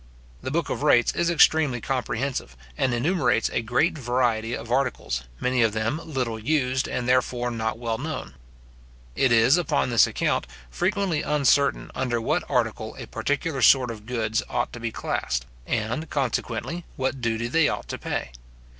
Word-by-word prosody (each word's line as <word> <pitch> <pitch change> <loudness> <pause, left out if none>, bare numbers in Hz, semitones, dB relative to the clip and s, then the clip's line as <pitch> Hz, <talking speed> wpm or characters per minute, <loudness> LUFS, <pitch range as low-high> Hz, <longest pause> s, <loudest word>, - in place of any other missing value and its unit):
The - - -4
book 165 +5 -1
of - - -3
rates 120 -5 +4
is 170 0 +1
extremely 155 -5 +4
comprehensive, 125 - -3 0.2
and 130 - +1
enumerates 125 - +1
a - - +1
great 125 +9 +1
variety 120 -3 0
of 115 - -8
articles, 125 - -1
many 125 -1 +1
of 110 -2 +3
them 110 +8 -1
little 125 -7 -3
used, 130 +1 0
and, 125 -1 -3
therefore, 125 -1 +1
not 110 -1 -2
well 115 -1 -3
known. 155 - -5 0.8
It 130 - +2
is, 120 +6 +5
upon 150 -7 0
this 115 -3 +6
account, - - -1 0.2
frequently 165 - 0
uncertain 140 -1 +2
under 120 -3 -1
what 115 - -1
article - - -1
a - - -7
particular 145 0 -2
sort 125 +1 +5
of 110 -1 -10
goods 115 -2 0
ought - - -1
to 120 - -7
be 115 -1 -3
classed, - - -2 0.2
and, 120 +8 -2
consequently 135 +4 -2
what 130 0 -2
duty 115 0 -1
they 160 +4 +3
ought - - -4
to - - -4
pay. - - -3
125 Hz, 165 wpm, -25 LUFS, 115-140 Hz, 0.8 s, this